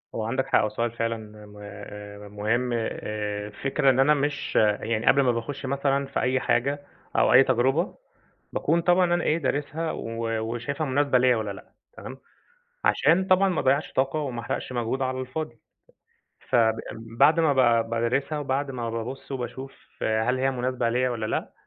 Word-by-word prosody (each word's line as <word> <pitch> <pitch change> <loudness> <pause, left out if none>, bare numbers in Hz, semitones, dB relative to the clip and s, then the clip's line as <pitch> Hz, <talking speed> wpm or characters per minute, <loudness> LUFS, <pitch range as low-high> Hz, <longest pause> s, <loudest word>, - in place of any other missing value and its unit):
هو 110 - -2
عندك 130 +4 -1
حق، - - +3
وسؤال 115 +2 -2
فعلًا 115 0 -2 1.1
م 105 - -15
مهم. 120 +4 0
آآ 105 -2 -3
الفكرة 135 +6 0
إن 130 - +3
أنا 140 +3 +5
مش 145 0 -2 0.3
يعني 110 0 -2
قبل 140 +1 +5
ما 125 -2 +3
باخش 135 +4 -4
مثلًا 140 +1 0
في 135 - -3
أي 130 +1 +1
حاجة 140 +4 0 0.3
أو - - +4
أي 130 +2 +8
تجربة، 135 - +1 0.6
باكون 170 +1 +1
طبعًا 175 0 +3
أنا 175 - -1
ايه، 155 - +2
دارسها 150 +2 -2
و 115 0 -3 0.2
وشايفها 140 +6 -3
مناسبة 140 0 +2
ليّا 125 -1 +4
والّا 110 -2 -3
لأ، 95 - -12 0.2
تمام، 130 0 -8 0.7
عشان 180 +3 +3
طبعًا 190 +1 +4
ما 180 - 0
اضيعش 140 +3 +1
طاقة 135 +3 0
وما 125 -5 -3
احرقش 130 - -4
مجهود 120 +2 -2
على 130 0 -1
الفاضي. 130 -1 -5 0.9
فب 110 -2 +4 0.2
بعد 115 +8 +2
ما 160 -3 +3
ب 120 -3 +3
بادرسها 125 +6 0
وبعد 135 0 -1
ما 120 -2 -4
بابص 115 +5 -6
وباشوف 130 +1 -5 0.3
هل 110 +4 +1
هي 135 +1 +2
مناسبة 125 -1 -1
ليّا 125 +2 +1
والّا 115 -3 -3
لأ، - - -3
130 Hz, 165 wpm, -25 LUFS, 115-140 Hz, 1.1 s, أي